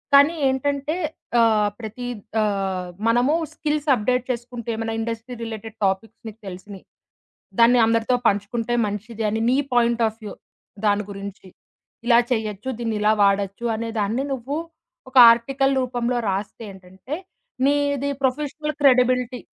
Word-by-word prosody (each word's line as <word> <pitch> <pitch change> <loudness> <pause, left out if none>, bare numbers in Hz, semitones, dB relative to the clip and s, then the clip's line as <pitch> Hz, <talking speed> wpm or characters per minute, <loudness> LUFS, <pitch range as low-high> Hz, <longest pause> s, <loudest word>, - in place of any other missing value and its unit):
కానీ 285 +4 +6
ఏంటంటే 280 +3 -1 0.4
ఆహ్, 215 -2 +4
ప్రతి 225 +2 -7 0.4
ఆహ్, 195 -3 -1 0.2
మనము 245 +5 +3 0.2
స్కిల్స్ 300 -1 -2
అప్డేట్ 250 +3 0
చేసుకుంటే, 240 -1 -6
ఏమైనా 225 0 -3
ఇండస్ట్రీ 230 +2 -4
రిలేటెడ్ 225 -1 -7
టాపిక్స్ 195 +3 -2
మీకు 220 0 -10
తెలిసినియి. 190 +1 -9 0.7
దాన్ని 240 +1 +6
అందరితో 230 +2 +2
పంచుకుంటే 215 +4 -1
మంచిది 210 +2 -5
అని, 220 +2 -1
నీ 255 - +3 0.2
పాయింట్ 235 -1 +2
ఆఫ్ 220 0 -6
వ్యూ 210 - -6 0.5
దాని 205 0 +2
గురించి 200 -1 -8 0.6
ఇలా 235 -1 +6
చేయొచ్చు, 220 0 -2
దీన్ని 225 -2 -2
ఇలా 210 +1 +4
వాడొచ్చు 200 +2 +1
అనే 230 +1 -4
దాన్ని 220 +7 0
నువ్వు 265 +3 -4 0.5
ఒక 260 - -3 0.2
ఆర్టికల్ 270 +3 0
రూపంలో 245 -1 -1
రాస్తే 195 +4 -4
ఏంటంటే, 190 +8 -8 0.5
నీది 285 -1 +1
ప్రొఫెషనల్ 300 +3 -1
క్రెడిబిలిటీ 250 -1 +3
230 Hz, 130 wpm, -22 LUFS, 210-255 Hz, 0.7 s, కానీ